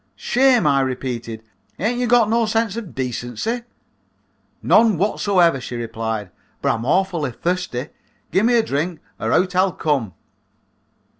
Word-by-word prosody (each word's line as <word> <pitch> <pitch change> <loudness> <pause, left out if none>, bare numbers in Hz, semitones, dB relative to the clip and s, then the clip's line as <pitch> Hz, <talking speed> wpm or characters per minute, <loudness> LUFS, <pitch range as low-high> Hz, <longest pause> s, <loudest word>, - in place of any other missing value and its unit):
"'Shame,' 255 -2 +3
I 140 -1 +4
repeated, 120 -4 -4 0.3
'ain't 235 +6 -1
you 250 - 0
got 240 -2 +4
no 230 +1 +2
sense 225 -1 0
of 230 -7 -7
decency?' 125 - -3 1.0
"'None 220 -4 +4
wot 200 +5 0
so 200 -2 0
ever,' 170 -7 +4
she 125 - -6
replied, 110 -4 -4 0.3
'but - - +1
I'm 115 0 -4
awfully 180 -6 +1
thirsty. 165 -1 -3 0.4
Gimme 225 +6 +3
a 230 - +4
drink 160 +1 -2 0.2
or 110 - -1
out 180 +5 +2
I'll 185 0 +3
come.' 135 - -1
175 Hz, 145 wpm, -21 LUFS, -, 1.0 s, I